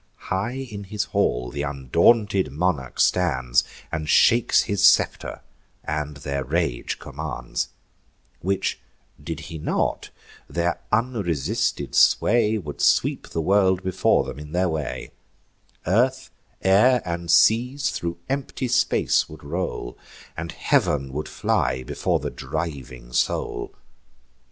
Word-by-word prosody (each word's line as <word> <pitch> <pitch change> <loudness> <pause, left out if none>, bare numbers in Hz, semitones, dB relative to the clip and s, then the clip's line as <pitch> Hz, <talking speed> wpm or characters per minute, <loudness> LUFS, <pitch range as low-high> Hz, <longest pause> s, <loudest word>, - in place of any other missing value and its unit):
High 120 +8 -2
in 100 -1 -7
his 105 +2 -2
hall 60 -12 0
th' 70 +3 -4
undaunted 90 - +2
monarch 75 -4 -1
stands, 65 -9 +2 0.3
And 75 -1 -3
shakes 120 +1 +5
his 100 -1 -1
scepter, - - +3 0.4
and 75 -1 -3
their 70 -1 -3
rage 75 -2 -1
commands; 65 -4 -4 0.7
Which 95 +2 -1 0.4
did 80 +1 -5
he 80 -1 -8
not, - - -1 0.4
their 85 0 -1
unresisted 110 - -1
sway 110 -1 +4
Would 75 -8 -6
sweep - - +2
the 80 - -2
world 95 +1 +3
before 95 0 +2
them 65 - -7
in 75 +1 -10
their 90 +1 +2
way; 80 -5 -4 0.7
Earth, 120 +9 +1 0.3
air, 110 +6 +5
and 85 -1 -4
seas 125 +9 +4
thro' 85 0 -4
empty 135 -1 -3
space 125 +2 +2
would 80 - -12
roll, 75 -5 -4 0.4
And 80 +1 -5
heav'n 70 -2 +1
would 75 +2 -4
fly 65 0 0
before - - -1
the - - -4
driving 65 -6 -6
soul. - - -1
85 Hz, 120 wpm, -24 LUFS, 70-105 Hz, 0.7 s, shakes